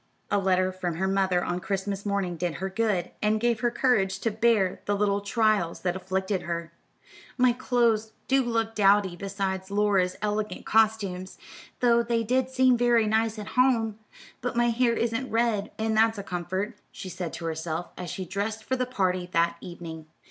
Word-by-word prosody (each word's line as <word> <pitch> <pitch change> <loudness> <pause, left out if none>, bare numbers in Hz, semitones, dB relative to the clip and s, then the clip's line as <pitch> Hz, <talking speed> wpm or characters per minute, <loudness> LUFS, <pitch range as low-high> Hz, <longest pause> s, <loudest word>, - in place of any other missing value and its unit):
A 205 - +3
letter 185 -1 +2
from 180 -3 -3
her 190 +3 0
mother 190 -2 +1
on 175 0 -2
Christmas 195 +1 -3
morning 195 -3 -1
did 170 -2 -2
her 190 +5 -4
good, 205 -4 0
and 215 +1 +2
gave 235 -1 +1
her 240 - +2
courage 215 -7 +1
to 230 - 0
bear 215 -4 +2
the 205 - +1
little 200 0 +1
trials 210 -5 +1
that 180 -1 -1
afflicted 190 +1 -2
her. 170 -1 -4 0.6
"My 250 -1 +5
clothes 235 -3 +1
do 270 +1 +4
look 225 -2 -1
dowdy 200 -3 +3
beside 190 0 -3
Laura's 200 -3 +1
elegant 210 -2 -2
costumes, 205 -4 +1 0.4
though 235 -1 +5
they 230 -1 0
did 255 +3 +1
seem 260 -1 +4
very 240 -2 +4
nice 220 +1 +1
at 210 -1 -6
home; 230 -4 +2 0.4
but 245 0 -3
my 240 0 +3
hair 235 0 +2
isn't 230 +3 -1
red, 225 -3 +1
and 220 0 0
that's 225 0 +3
a 200 - -5
comfort," 190 +4 -3
she - - -8
said 180 -2 -5
to 170 - -6
herself, 160 +1 -3
as 180 -1 -6
she 190 - -4
dressed 210 +4 -3
for 260 - -1
the 255 -1 -1
party 185 -7 -1
that 170 0 +2
evening. 165 -3 -8
205 Hz, 180 wpm, -27 LUFS, 185-230 Hz, 0.6 s, My